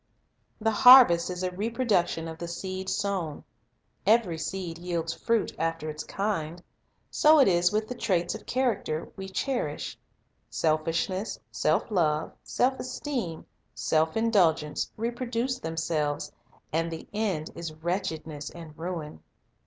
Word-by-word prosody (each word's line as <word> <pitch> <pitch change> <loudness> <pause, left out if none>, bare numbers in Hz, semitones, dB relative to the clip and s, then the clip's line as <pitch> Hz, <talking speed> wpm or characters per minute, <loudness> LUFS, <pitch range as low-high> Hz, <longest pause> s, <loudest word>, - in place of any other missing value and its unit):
The 225 0 +1
harvest 235 -8 +8
is 180 0 -4
a 185 - 0
reproduction 200 -5 0
of 160 0 -8
the 170 - -4
seed 185 +2 -4
sown. 190 -7 -2 0.6
Every 210 -7 +3
seed 170 0 -4
yields 170 -2 -2
fruit 230 +5 0
"after 165 -1 -1
its 155 0 -6
kind." 175 -4 -3 0.5
So 310 +1 +6
it 275 - +6
is 175 -1 +4
with 215 +1 0
the 250 - -4
traits 175 -7 0
of - - -9
character 235 -11 -1
we 190 0 -7
cherish. 190 - -2 0.5
Selfishness, 165 +5 0
self - - +1
love, 155 -5 +1
self 260 +1 0
esteem, 250 - -4 0.3
self 160 +4 +1
indulgence, 180 -10 +2
reproduce 240 +2 -2
themselves, 160 -2 -2 0.4
and 165 +1 +1
the 165 -1 -7
end 195 -8 -1
is 165 -2 -5
wretchedness 160 -3 -3
and 165 -3 -11
ruin. 160 - -5
175 Hz, 130 wpm, -28 LUFS, 160-220 Hz, 0.6 s, harvest